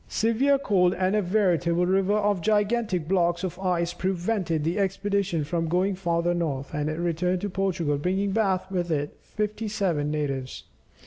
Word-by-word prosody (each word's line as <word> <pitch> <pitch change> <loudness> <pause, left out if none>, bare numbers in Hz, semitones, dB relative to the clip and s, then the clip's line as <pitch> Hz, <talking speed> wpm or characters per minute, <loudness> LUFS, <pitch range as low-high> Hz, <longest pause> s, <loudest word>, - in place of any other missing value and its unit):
Severe 245 +6 +2
cold, 190 -8 +2
and 185 +2 +1
a 210 - +3
veritable 175 -3 +2
river 195 +2 +2
of 205 -3 +1
gigantic 210 -3 +1
blocks 175 -1 +1
of 180 -1 -4
ice 175 -2 0
prevented 185 -3 -1
the 170 +6 -1
expedition 195 -3 0
from 165 +2 -2
going 185 +4 +1
farther 175 -2 0
north, 145 -6 -3
and 150 0 -1
it 155 - -3
returned 175 +2 0
to 205 - -3
Portugal 175 -7 0
bringing 190 +5 0
back 190 -3 0
with 175 -2 -1
it 145 -2 -2
fifty 215 +1 -3
seven 180 -8 0
natives. 140 -4 -3
180 Hz, 165 wpm, -26 LUFS, 170-200 Hz, -, a